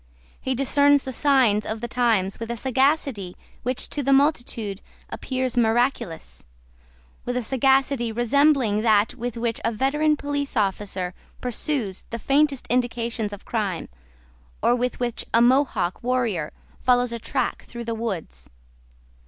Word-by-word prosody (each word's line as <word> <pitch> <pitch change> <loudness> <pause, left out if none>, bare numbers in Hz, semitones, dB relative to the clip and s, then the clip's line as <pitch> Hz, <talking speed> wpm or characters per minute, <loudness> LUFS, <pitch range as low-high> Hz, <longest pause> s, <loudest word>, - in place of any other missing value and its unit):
He 260 0 -1
discerns 285 +2 +4
the 260 - -5
signs 250 -6 +3
of 220 +1 -4
the 240 - -4
times 225 -6 +1
with 230 0 -5
a 235 - -3
sagacity 260 - 0 0.2
which 255 +1 0
to 290 - -1
the 275 0 +1
multitude 240 -8 +1 0.3
appears 255 -2 -3
miraculous, 235 - 0 0.8
with 245 0 -2
a 250 - -1
sagacity 265 -1 +2
resembling 240 -2 +2
that 215 -2 +3
with 240 0 -5
which 230 -1 -2
a 230 - +1
veteran 295 +6 +1
police 285 -2 -3
officer 195 -3 -1 0.3
pursues 245 -5 -2
the 230 - -4
faintest 275 +2 +1
indications 235 -3 -1
of 205 - -9
crime, 205 -7 -2 0.7
or 240 - +4
with 250 +1 -1
which 240 -2 -2
a - - +6
Mohawk 245 -7 +2
warrior 235 -11 -1 0.3
follows 245 -1 +2
a 235 - -4
track 260 +2 -2
through 235 0 -7
the 230 - -2
woods. 195 - -5
240 Hz, 140 wpm, -24 LUFS, 220-270 Hz, 0.8 s, a